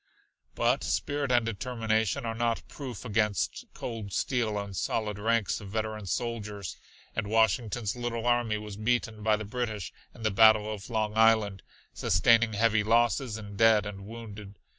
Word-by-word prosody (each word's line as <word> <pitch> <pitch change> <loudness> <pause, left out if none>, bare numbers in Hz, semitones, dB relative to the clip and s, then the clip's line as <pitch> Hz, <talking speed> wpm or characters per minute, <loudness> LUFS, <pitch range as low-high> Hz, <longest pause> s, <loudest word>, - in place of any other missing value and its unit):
But - - +2
spirit 145 -2 -1
and 120 -2 +3
determination 115 +2 -1
are 115 - -2
not 115 0 -1
proof 130 -6 -8
against 105 -2 0
cold 110 -4 -6
steel 115 0 0
and 100 -1 -5
solid 105 +1 -2
ranks 115 0 +1
of 100 - -9
veteran 110 -1 -3
soldiers, 105 -4 -3 0.4
and 110 -2 -1
Washington's 110 0 +1
little 120 -1 -3
army 120 -3 +2
was 105 -1 -8
beaten 110 -1 -1
by 110 0 +3
the 110 0 -5
British 110 -3 -4 0.2
in 115 - -11
the 110 - +2
Battle 110 0 +5
of 100 +1 -9
Long 110 -2 -1
Island, 110 -3 +4 0.3
sustaining 115 -1 +3
heavy 110 0 +3
losses 115 +1 +2
in 105 -2 -9
dead 110 -1 +5
and 100 -1 -7
wounded. 105 -3 -9
110 Hz, 155 wpm, -29 LUFS, 105-115 Hz, 0.4 s, Battle